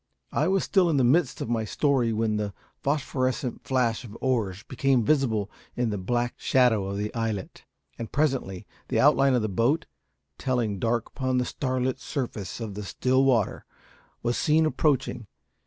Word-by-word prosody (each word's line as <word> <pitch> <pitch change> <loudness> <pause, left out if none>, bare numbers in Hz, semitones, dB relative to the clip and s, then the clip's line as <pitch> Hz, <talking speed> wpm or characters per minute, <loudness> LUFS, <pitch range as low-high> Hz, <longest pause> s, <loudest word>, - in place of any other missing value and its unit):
I - - +1
was 190 0 +2
still 190 -4 +3
in 155 - +2
the 130 - +3
midst 135 +3 +2
of - - -3
my 115 -2 +1
story 125 +1 +1
when 110 -1 0
the 105 -2 -3 0.3
phosphorescent 135 -3 -1
flash 125 -3 0
of 115 -2 -10
oars 110 -7 -1
became 130 -1 +1
visible 115 -9 +1 0.2
in 120 -2 0
the 105 - -2
black 120 +5 -1
shadow 120 -6 +3
of 100 0 -3
the 105 +1 -3
islet, 110 -5 -4 0.3
and 115 - -5
presently 135 -11 -1 0.2
the - - 0
outline 135 -1 +5
of 120 - +1
the - - +1
boat, 120 - +1 0.5
telling 120 -6 -1
dark 115 +2 0
upon 130 -2 -1
the 125 - +1
starlit 130 -1 -1
surface 120 - -4
of 110 -3 -5
the 105 - -5
still 130 +6 +1
water, 120 -6 +2 0.6
was 120 0 0
seen 155 +1 +3
approaching. 140 -7 0
125 Hz, 170 wpm, -26 LUFS, 110-135 Hz, 0.6 s, outline